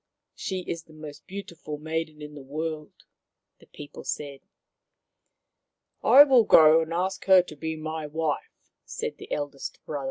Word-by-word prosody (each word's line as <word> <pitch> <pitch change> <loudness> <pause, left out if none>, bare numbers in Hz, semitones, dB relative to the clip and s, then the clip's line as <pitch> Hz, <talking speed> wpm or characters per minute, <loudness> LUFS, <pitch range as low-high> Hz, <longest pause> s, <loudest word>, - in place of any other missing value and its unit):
She 190 -1 -4
is 170 -2 -6
the 155 - -18
most 155 -1 -11
beautiful 170 -6 -7
maiden 155 0 -4
in 150 0 -9
the 145 - -10
world/' 155 +2 -6 0.5
the - - -20
people 145 -1 -11
said. 140 -2 -5 0.8
" - - -55
I 280 - +9
will 260 -5 +5
go 160 -4 +7
and 160 0 -5
ask 185 +2 -2
her 190 -2 +7
to 155 - -11
be 160 +2 -4
my 155 0 -5
wife," 155 0 -4
said - - -5
the - - -11
eldest 145 -1 -4
brother. 145 - -4
160 Hz, 160 wpm, -26 LUFS, 150-170 Hz, 0.8 s, I